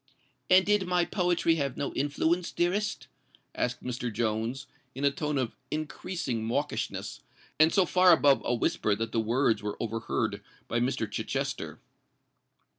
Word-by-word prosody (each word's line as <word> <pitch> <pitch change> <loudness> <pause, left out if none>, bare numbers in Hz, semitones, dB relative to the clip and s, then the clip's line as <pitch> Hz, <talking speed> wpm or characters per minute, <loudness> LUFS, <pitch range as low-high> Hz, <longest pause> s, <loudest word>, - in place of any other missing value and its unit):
"And 185 +1 +6
did 205 -2 +2
my 180 -1 +2
poetry 175 -3 +1
have 140 -3 -2
no 140 - -3
influence, 160 +5 0
dearest?" 195 +5 -1 0.5
asked 125 0 -2
Mr. 125 -1 -3
Jones, 115 +4 -2 0.3
in 140 +2 -1
a 140 - +4
tone 150 +1 -2
of 125 -4 -2
increasing 150 -5 -3
mawkishness, 140 +6 -2 0.4
and 160 +1 +6
so 190 -3 +4
far 180 +1 +5
above 140 -3 +5
a 120 - +1
whisper 110 -2 +1
that 115 +1 -3
the 115 - +1
words 115 +1 +1
were 105 0 -4
overheard 115 0 -2 0.3
by 120 - 0
Mr. 120 -2 0
Chichester. 105 - -3
140 Hz, 145 wpm, -29 LUFS, 115-175 Hz, 0.5 s, And